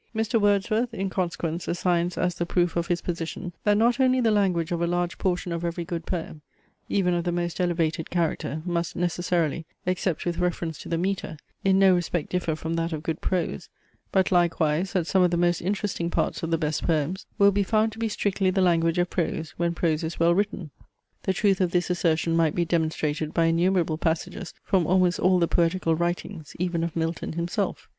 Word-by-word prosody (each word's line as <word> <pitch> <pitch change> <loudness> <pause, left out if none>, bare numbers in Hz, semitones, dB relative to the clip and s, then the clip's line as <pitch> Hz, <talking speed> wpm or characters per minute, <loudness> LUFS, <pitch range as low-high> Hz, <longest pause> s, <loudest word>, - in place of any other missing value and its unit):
Mr. 225 +1 +1
Wordsworth, 215 +4 +1
in 195 -1 -2
consequence, 170 -2 -2
assigns 175 0 0
as 180 -1 +1
the 170 0 -2
proof 175 -1 +1
of 170 0 0
his 175 -1 0
position, 170 +1 -4
"that 205 0 +4
not 235 +3 +3
only 260 -1 +4
the 230 -3 +3
language 185 -6 +1
of 170 -1 -1
a 170 - +1
large 175 0 -1
portion 180 -1 -1
of 170 0 -3
every 170 0 -3
good 165 -1 -5
poem, 160 -4 -4 0.5
even 180 -3 +2
of 175 -1 0
the 175 - -1
most 175 +1 -2
elevated 165 -2 0
character, 160 -3 -1
must 170 -1 -2
necessarily, 175 -2 0 0.2
except 180 -2 -1
with 175 -1 -2
reference 170 -2 -2
to - - -9
the 165 - 0
metre, 185 -2 -2 0.3
in 190 0 +4
no 195 -1 +6
respect 175 -2 -1
differ 175 -3 0
from 160 +1 -4
that 165 0 -1
of 155 -1 -4
good 165 -1 -3
prose, 170 - -2 0.4
but 190 0 +2
likewise 170 0 +2
that 180 -4 +1
some 190 +2 +2
of 180 - +5
the 170 - 0
most 175 0 +2
interesting 195 -2 -2
parts - - -1
of 165 - -3
the 165 - +2
best 155 -2 -1
poems 165 +3 -1
will 200 0 +6
be 200 +1 +1
found 215 +2 +2
to 220 - -11
be 225 -1 0
strictly 200 -2 0
the 185 - 0
language 165 -2 +3
of 175 0 +2
prose, 165 -3 -2
when 170 0 0
prose 160 -2 0
is 160 +1 -4
well 170 +1 +4
written. 195 -4 -1 0.5
The - - +2
truth 195 -1 +2
of 180 - +2
this 180 +1 0
assertion 165 -1 +1
might 165 -2 +2
be 175 - +1
demonstrated 155 -2 -1
by 165 - +3
innumerable 165 -1 +2
passages 170 +3 -2
from 180 -5 +1
almost 180 -1 +3
all 185 +1 +4
the 170 -1 +2
poetical 170 0 +1
writings, 170 -1 -3
even 175 -1 -1
of 170 -2 -3
Milton 165 0 -2
himself." 170 +1 -2
175 Hz, 205 wpm, -25 LUFS, 165-185 Hz, 0.5 s, no